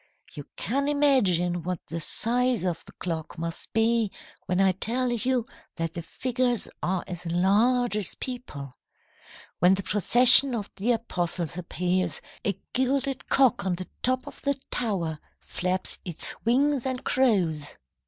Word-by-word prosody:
"You -, -, -9 dB
can 275 Hz, +3 st, -1 dB
imagine 200 Hz, -, +2 dB
what 180 Hz, 0 st, -4 dB
the 165 Hz, -, -5 dB
size 245 Hz, +7 st, +1 dB
of 175 Hz, -3 st, -2 dB
the -, -, -14 dB
clock 165 Hz, -3 st, -5 dB
must 165 Hz, 0 st, -4 dB
be 225 Hz, -1 st, +1 dB, 0.4 s
when 180 Hz, 0 st, 0 dB
I 195 Hz, -1 st, +4 dB
tell 240 Hz, +7 st, 0 dB
you 240 Hz, 0 st, 0 dB, 0.3 s
that 165 Hz, -1 st, -3 dB
the 170 Hz, -, -5 dB
figures 245 Hz, +5 st, -1 dB
are 185 Hz, 0 st, -1 dB
as 180 Hz, -1 st, -7 dB
large 210 Hz, +8 st, +2 dB
as 210 Hz, -3 st, -1 dB
people. 150 Hz, -, -7 dB, 0.9 s
When 180 Hz, +2 st, +5 dB
the 195 Hz, -, -4 dB
procession 245 Hz, +7 st, +7 dB
of 210 Hz, -3 st, -5 dB
the 230 Hz, +5 st, +1 dB
apostles 175 Hz, -7 st, -3 dB
appears, 180 Hz, 0 st, -1 dB, 0.2 s
a 200 Hz, -2 st, -2 dB
gilded 265 Hz, +1 st, -1 dB
cock 265 Hz, -4 st, +3 dB
on 185 Hz, -2 st, -1 dB
the 185 Hz, +1 st, -7 dB
top 255 Hz, +1 st, 0 dB
of -, -, -11 dB
the 280 Hz, 0 st, 0 dB, 0.2 s
tower 175 Hz, -10 st, -2 dB, 0.2 s
flaps 185 Hz, +1 st, -1 dB
its 175 Hz, -4 st, -5 dB
wings 270 Hz, +2 st, +2 dB
and 255 Hz, -1 st, -4 dB
crows. 180 Hz, -, 0 dB
205 Hz, 145 wpm, -26 LUFS, 175-250 Hz, 0.9 s, procession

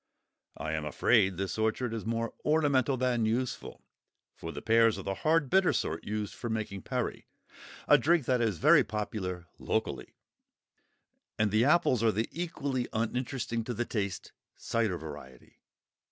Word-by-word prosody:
I 75 Hz, +2 st, -4 dB
am 80 Hz, -1 st, -2 dB
afraid 95 Hz, +5 st, +2 dB
this 95 Hz, +2 st, -3 dB
orchard 110 Hz, +2 st, 0 dB
is 110 Hz, -1 st, -5 dB
more 115 Hz, 0 st, -2 dB
ornamental 145 Hz, -4 st, +2 dB
than 125 Hz, -2 st, +1 dB
useful, 125 Hz, +3 st, -2 dB, 0.5 s
for 80 Hz, -, -7 dB
the -, -, -6 dB
pears 115 Hz, 0 st, +4 dB
are -, -, -6 dB
the 100 Hz, -, -2 dB
hard 155 Hz, +7 st, +2 dB
bitter 190 Hz, +6 st, +4 dB
sort 80 Hz, -, -2 dB
used 105 Hz, -1 st, -3 dB
for 120 Hz, -, -6 dB
making 110 Hz, -3 st, -3 dB
perry, -, -, -3 dB, 0.6 s
a -, -, +7 dB
drink 165 Hz, -2 st, +2 dB
that 125 Hz, -1 st, +2 dB
is 110 Hz, -6 st, 0 dB
very -, -, +6 dB
popular 95 Hz, -4 st, -4 dB
locally; -, -, -2 dB, 1.2 s
and 105 Hz, -1 st, +1 dB
the 110 Hz, +3 st, +3 dB
apples 150 Hz, -6 st, +3 dB
are 115 Hz, -1 st, +4 dB
the 110 Hz, +2 st, -1 dB
equally 140 Hz, -7 st, -3 dB
uninteresting 115 Hz, +1 st, -2 dB
to 120 Hz, -, -3 dB
the 120 Hz, +3 st, -1 dB
taste 100 Hz, -5 st, -3 dB, 0.2 s
cider 110 Hz, -6 st, -1 dB
variety. 75 Hz, -5 st, -11 dB
115 Hz, 155 wpm, -30 LUFS, 100-130 Hz, 1.2 s, a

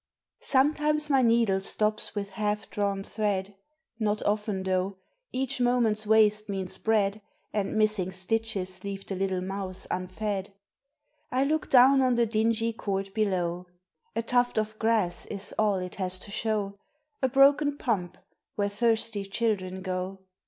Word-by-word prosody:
SOMETIMES 300 Hz, +2 st, +2 dB
my 270 Hz, -1 st, +5 dB
needle 230 Hz, -5 st, +3 dB
stops 215 Hz, +2 st, 0 dB
with 200 Hz, -1 st, -3 dB
half 210 Hz, 0 st, -2 dB
drawn 200 Hz, -1 st, -1 dB
thread 205 Hz, -2 st, -2 dB, 0.5 s
(Not 210 Hz, -1 st, 0 dB
often 210 Hz, -2 st, 0 dB
though, 190 Hz, +1 st, -1 dB, 0.3 s
each 265 Hz, 0 st, -1 dB
moment's 230 Hz, -4 st, +2 dB
waste 215 Hz, -1 st, +4 dB
means 190 Hz, -2 st, -2 dB
bread, 210 Hz, -1 st, +1 dB, 0.3 s
And 205 Hz, -1 st, -1 dB
missing 215 Hz, -4 st, +2 dB
stitches 185 Hz, -1 st, -2 dB
leave 195 Hz, -1 st, -5 dB
the 195 Hz, -, -4 dB
little 190 Hz, -1 st, -1 dB
mouths 190 Hz, 0 st, -4 dB
unfed). 195 Hz, +2 st, -3 dB, 0.8 s
I 260 Hz, +1 st, +2 dB
look 310 Hz, +3 st, 0 dB
down 265 Hz, +1 st, +7 dB
on 255 Hz, -2 st, +3 dB
the 235 Hz, 0 st, +3 dB
dingy 225 Hz, +1 st, +1 dB
court 195 Hz, -3 st, -3 dB
below: 180 Hz, -4 st, -1 dB, 0.5 s
A 230 Hz, -, 0 dB
tuft 245 Hz, 0 st, +1 dB
of 215 Hz, 0 st, -1 dB
grass 220 Hz, -6 st, +1 dB
is 200 Hz, -1 st, -3 dB
all 210 Hz, -2 st, +3 dB
it 180 Hz, -1 st, -4 dB
has 185 Hz, 0 st, +1 dB
to 200 Hz, -, -7 dB
show, 205 Hz, -2 st, -2 dB, 0.4 s
A 260 Hz, -, +2 dB
broken 280 Hz, +2 st, +4 dB
pump, 185 Hz, -9 st, -2 dB, 0.4 s
where 205 Hz, -1 st, 0 dB
thirsty 225 Hz, -1 st, 0 dB
children 195 Hz, -3 st, -2 dB
go. 185 Hz, +1 st, -4 dB
210 Hz, 145 wpm, -28 LUFS, 195-230 Hz, 0.8 s, down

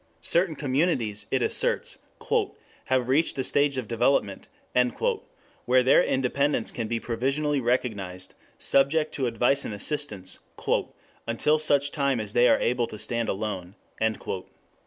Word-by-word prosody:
Certain 170 Hz, -1 st, +3 dB
communities, 130 Hz, -, -1 dB
it -, -, +1 dB
asserts, -, -, 0 dB, 0.9 s
"have 130 Hz, -2 st, +1 dB
reached 140 Hz, +5 st, +2 dB
a 130 Hz, -, 0 dB
stage 140 Hz, +1 st, +2 dB
of 125 Hz, -4 st, -3 dB
development" 115 Hz, -3 st, 0 dB, 1.2 s
where 125 Hz, +1 st, +4 dB
their 130 Hz, -, +5 dB
independence 135 Hz, 0 st, 0 dB
can 115 Hz, -2 st, -4 dB
be 115 Hz, +1 st, -2 dB
provisionally 135 Hz, +5 st, -1 dB
recognized, 100 Hz, -7 st, -2 dB, 0.2 s
subject 150 Hz, +3 st, +2 dB
to 130 Hz, -3 st, -1 dB
advice 120 Hz, +4 st, +2 dB
and 105 Hz, -, -5 dB
assistance 105 Hz, -7 st, -3 dB, 0.9 s
"until 150 Hz, +7 st, +2 dB
such 145 Hz, -2 st, +3 dB
time 140 Hz, -4 st, 0 dB
as 105 Hz, -1 st, -4 dB
they 120 Hz, +1 st, +5 dB
are -, -, +5 dB
able 120 Hz, -1 st, 0 dB
to 110 Hz, -, -9 dB
stand 115 Hz, +2 st, -1 dB
alone." 95 Hz, -2 st, -4 dB
125 Hz, 130 wpm, -26 LUFS, 115-140 Hz, 1.2 s, their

